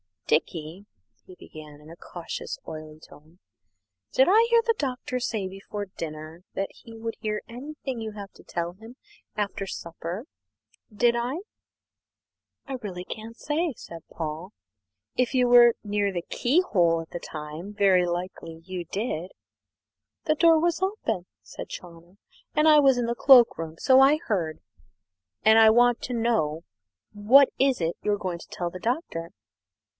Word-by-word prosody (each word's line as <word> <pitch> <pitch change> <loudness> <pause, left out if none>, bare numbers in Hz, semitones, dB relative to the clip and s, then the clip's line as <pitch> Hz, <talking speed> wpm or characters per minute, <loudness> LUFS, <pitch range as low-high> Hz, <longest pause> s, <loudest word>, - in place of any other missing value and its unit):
"Dickie," 160 +4 -1 0.4
he 185 - -13
began, 150 -3 -12
in 150 - -15
a 165 - -10
cautious, 175 -1 -6
oily 155 0 -8
tone, 160 +3 -18 0.7
"did - - +5
I 445 +4 +5
hear 470 -1 +5
the 460 - +3
Doctor 255 -3 -3
say 220 -5 -2
before 195 +2 -6
dinner 160 -1 -8
that 195 - -2
he 230 -3 -14
would 225 0 -5
hear 215 -1 -2
anything 265 +1 -6
you 220 -1 -5
have 200 -2 -9
to - - -18
tell 170 0 -3
him 225 +6 -13 0.4
after 200 -2 -3
supper? 170 +5 -6 0.7
Did 235 +3 +2
I?" 250 +7 -2 1.3
"I 270 -1 -4
really 180 -5 -6
can't 225 +4 -8
say, 310 +1 -1
sir," 170 -6 -10
said 165 - -16
Paul; 160 +4 -6 0.6
"if 250 +1 +1
you 250 -1 +3
were 240 -1 +7
near 205 -1 0
the 175 -2 -3
keyhole 195 - +2
at 165 - -12
the 175 - -5
time, 155 +6 -8
very 195 -3 +4
likely 175 -2 -5
you 180 -1 -6
did." 185 -2 -3 0.9
"The 310 - +1
door 330 0 +5
was 340 +2 0
open," 300 - -2 0.2
said - - -9
Chawner, 170 +1 -11 0.4
"and 305 +1 +4
I 305 -1 +8
was 270 -3 +5
in 245 - 0
the 235 0 -1
cloak 245 -1 +6
room, 160 -1 -6
so 260 +6 +5
I 275 +3 +6
heard, 170 -8 -1 0.8
and 220 +1 +6
I 220 -1 +8
want 240 +1 +4
to 250 - -4
know. 220 -10 0 0.5
What 240 +7 +6
is 265 -5 +2
it 165 +1 -1
you're 205 -1 0
going 180 -3 -4
to - - -12
tell 175 -1 -4
the 185 - -8
Doctor?" 205 - -3
205 Hz, 160 wpm, -26 LUFS, 170-245 Hz, 1.3 s, I